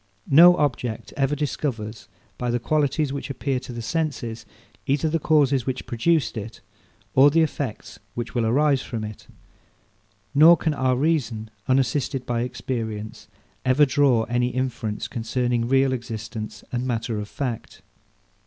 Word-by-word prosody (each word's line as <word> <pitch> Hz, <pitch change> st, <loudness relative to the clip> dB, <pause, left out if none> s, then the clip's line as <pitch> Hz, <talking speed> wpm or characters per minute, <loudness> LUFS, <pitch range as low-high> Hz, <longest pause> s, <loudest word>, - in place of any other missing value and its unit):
No 175 Hz, +5 st, +8 dB
object 125 Hz, -6 st, -2 dB
ever 140 Hz, +1 st, +1 dB
discovers, 120 Hz, -7 st, -3 dB, 0.3 s
by 125 Hz, -, -1 dB
the 120 Hz, -, +1 dB
qualities 145 Hz, +2 st, 0 dB
which 140 Hz, -, -5 dB
appear 135 Hz, 0 st, -2 dB
to 125 Hz, -, -9 dB
the 120 Hz, -1 st, -6 dB
senses, 120 Hz, -7 st, -3 dB, 0.4 s
either 140 Hz, +3 st, +1 dB
the 165 Hz, +1 st, 0 dB
causes 140 Hz, -5 st, +2 dB
which 130 Hz, -1 st, -3 dB
produced 125 Hz, 0 st, +1 dB
it, 110 Hz, +2 st, -7 dB, 0.5 s
or 135 Hz, +2 st, +7 dB
the 165 Hz, +3 st, +3 dB
effects 140 Hz, -6 st, -4 dB, 0.2 s
which 120 Hz, -1 st, -4 dB
will 120 Hz, -, +1 dB
arise 140 Hz, +3 st, +3 dB
from 115 Hz, -4 st, -5 dB
it; 105 Hz, -1 st, -8 dB, 1.1 s
nor 160 Hz, +4 st, +8 dB
can 160 Hz, -, 0 dB
our 130 Hz, -2 st, +1 dB
reason, 125 Hz, -7 st, -1 dB, 0.2 s
unassisted 130 Hz, 0 st, +1 dB
by 120 Hz, -1 st, -1 dB
experience, 115 Hz, -3 st, -5 dB, 0.4 s
ever 130 Hz, +3 st, +4 dB
draw 130 Hz, -4 st, +3 dB
any 120 Hz, +1 st, 0 dB
inference 125 Hz, -4 st, -3 dB
concerning 120 Hz, 0 st, -1 dB
real 135 Hz, +1 st, +3 dB
existence 115 Hz, -2 st, -6 dB
and 125 Hz, +1 st, -2 dB
matter 115 Hz, -2 st, -2 dB
of 105 Hz, 0 st, -6 dB
fact. 125 Hz, -6 st, -5 dB
130 Hz, 145 wpm, -24 LUFS, 115-145 Hz, 1.1 s, No